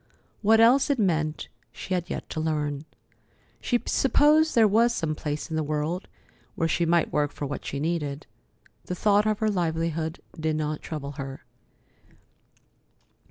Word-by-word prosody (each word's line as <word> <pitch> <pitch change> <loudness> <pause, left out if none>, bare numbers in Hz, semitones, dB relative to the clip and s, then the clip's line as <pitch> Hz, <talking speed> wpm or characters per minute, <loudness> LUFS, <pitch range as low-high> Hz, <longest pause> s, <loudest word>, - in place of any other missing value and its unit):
What 220 +1 +5
else 250 +6 +5
it 285 - +2
meant, 160 -7 0 0.2
she 185 - -6
had 175 -2 -2
yet - - -5
to - - -3
learn. 150 -2 -2 0.8
She 245 - +1
supposed 305 +3 +3
there 225 -2 +6
was 230 +3 +3
some 155 -1 -1
place 150 0 -4
in - - -1
the 160 - +1
world 155 +5 -2 0.5
where 165 -5 0
she 170 +1 +1
might 170 -1 +2
work 145 -1 +1
for 145 - -5
what 140 - -5
she 140 - -4
needed. 150 -2 -2 0.6
The 180 - -4
thought 205 +3 +3
of 215 -1 +1
her 220 0 +1
livelihood 165 -2 -1 0.2
did 155 0 0
not 155 0 -2
trouble 145 -3 -5
her. 135 0 -8
165 Hz, 160 wpm, -26 LUFS, 150-210 Hz, 0.8 s, there